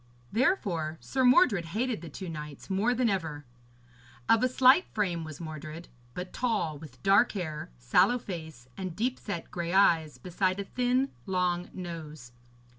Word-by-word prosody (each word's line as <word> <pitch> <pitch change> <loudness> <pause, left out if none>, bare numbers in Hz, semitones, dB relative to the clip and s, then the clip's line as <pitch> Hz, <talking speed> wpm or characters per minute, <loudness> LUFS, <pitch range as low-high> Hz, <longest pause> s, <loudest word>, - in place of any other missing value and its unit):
Therefore 185 - +1
Sir 260 -1 -1
Mordred 250 - +5
hated 240 -6 -1
the 170 - -8
two 185 +6 -7
knights 150 +1 -7
more 215 +6 +2
than 250 0 +2
ever. 160 -8 -2 0.8
Of 225 0 +5
a 255 - +3
slight 260 +6 +5
frame 180 -6 0
was 155 -2 -8
Mordred, 155 0 -7 0.3
but 180 0 -6
tall, 210 - -1
with 130 -5 -13
dark 200 +5 +5
hair, 160 -7 -4
sallow - - +3
face, 160 - -8
and 185 -3 -5
deep 245 +5 -1
set 175 -6 -5
grey 170 0 -3
eyes 165 -6 +4
beside 185 +1 -1
a - - -1
thin 250 +5 0 0.2
long 180 -2 0
nose. 155 -8 -8
180 Hz, 155 wpm, -29 LUFS, 160-225 Hz, 0.8 s, Mordred